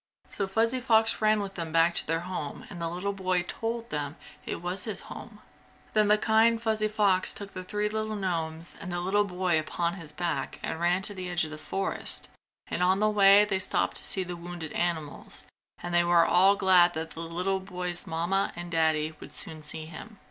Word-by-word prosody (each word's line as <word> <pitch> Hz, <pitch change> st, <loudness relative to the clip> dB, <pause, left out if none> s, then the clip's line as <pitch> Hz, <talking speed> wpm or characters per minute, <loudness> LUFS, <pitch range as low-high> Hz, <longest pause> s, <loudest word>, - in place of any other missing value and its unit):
So 195 Hz, -, -3 dB
Fuzzy 230 Hz, +6 st, +1 dB
Fox 225 Hz, -3 st, +3 dB
ran 215 Hz, -1 st, +3 dB
with 195 Hz, -1 st, -5 dB
them 165 Hz, -3 st, -5 dB
back 165 Hz, +1 st, +4 dB
to -, -, +3 dB
their 165 Hz, +1 st, 0 dB
home 175 Hz, -5 st, -5 dB
and 175 Hz, -3 st, -7 dB
the 165 Hz, -, -1 dB
little 180 Hz, +4 st, -3 dB
boy 185 Hz, -2 st, 0 dB
told 230 Hz, +5 st, -4 dB
them 145 Hz, 0 st, -3 dB, 0.3 s
it -, -, -3 dB
was 180 Hz, +2 st, -3 dB
his 215 Hz, -3 st, -3 dB
home. -, -, -10 dB, 0.5 s
Then 215 Hz, -1 st, +4 dB
the 210 Hz, +1 st, +5 dB
kind 225 Hz, +2 st, +3 dB
Fuzzy 220 Hz, -1 st, +1 dB
Fox 205 Hz, -3 st, +2 dB
took 200 Hz, -1 st, -7 dB
the 185 Hz, -, -6 dB
three 210 Hz, +3 st, -1 dB
little 215 Hz, 0 st, -2 dB
gnomes 165 Hz, -4 st, -3 dB
and 180 Hz, -, -5 dB
the 175 Hz, -, -2 dB
little 200 Hz, +4 st, +2 dB
boy 180 Hz, -3 st, +1 dB
upon 170 Hz, +2 st, -2 dB
his 165 Hz, -5 st, -9 dB
back 150 Hz, -3 st, -3 dB
and 160 Hz, -, -3 dB
ran 175 Hz, +2 st, +1 dB
to 205 Hz, -, +4 dB
the 185 Hz, -2 st, -5 dB
edge 175 Hz, -2 st, +1 dB
of 155 Hz, -, -8 dB
the 155 Hz, -, -7 dB
forest 195 Hz, +5 st, -3 dB, 0.4 s
and -, -, -3 dB
on 185 Hz, +1 st, +4 dB
the 215 Hz, +1 st, +2 dB
way 200 Hz, 0 st, +7 dB
they 195 Hz, -2 st, 0 dB
stopped 190 Hz, -, 0 dB
to -, -, +1 dB
see 190 Hz, -, +3 dB
the 180 Hz, -1 st, -6 dB
wounded 170 Hz, -2 st, -7 dB
animals, 160 Hz, -4 st, -3 dB, 0.4 s
and 175 Hz, -, -4 dB
they 175 Hz, 0 st, +5 dB
were 170 Hz, -1 st, +5 dB
all 190 Hz, +3 st, +5 dB
glad 180 Hz, -3 st, +5 dB
that 160 Hz, 0 st, -4 dB
the -, -, -9 dB
little 180 Hz, +4 st, -1 dB
boy's 180 Hz, -2 st, -2 dB
Mamma 175 Hz, +4 st, 0 dB
and 175 Hz, 0 st, -7 dB
Daddy 160 Hz, -1 st, +2 dB
would -, -, -11 dB
soon 160 Hz, -1 st, -3 dB
see 155 Hz, +1 st, -6 dB
him. 185 Hz, +7 st, -10 dB
180 Hz, 215 wpm, -28 LUFS, 170-205 Hz, 0.5 s, way